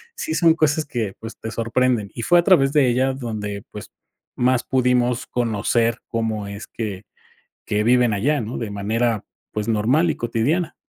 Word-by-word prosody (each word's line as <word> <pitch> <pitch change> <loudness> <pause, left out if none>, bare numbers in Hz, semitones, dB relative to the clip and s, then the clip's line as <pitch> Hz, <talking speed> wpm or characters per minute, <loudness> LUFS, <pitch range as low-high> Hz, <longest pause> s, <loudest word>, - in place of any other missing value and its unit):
sí 160 - -3
son 165 -1 +5
cosas 155 -1 +1
que, 115 -8 -3
pues, 115 0 -8
te 110 - -6
sorprenden. 115 -1 0
Y 115 - -5
fue 175 +9 +4
a - - +2
través 145 -7 +4
de 145 -4 +4
ella 130 +2 +2
donde, 105 -6 -5
pues, 105 - -9 0.5
más 125 0 +2
pudimos 125 -1 +1
conocer 115 0 0
cómo 110 -2 -2
es 100 +1 -8
que 105 -3 -5 0.6
que 105 0 0
viven 120 -2 +4
allá, 140 +9 +1
¿no? 115 +2 -5
De 110 -3 -4
manera, 110 +2 -1 0.3
pues, 105 0 -3
normal 120 +10 +2
y - - -2
cotidiana. 135 +9 -1
120 Hz, 170 wpm, -22 LUFS, 110-130 Hz, 0.6 s, son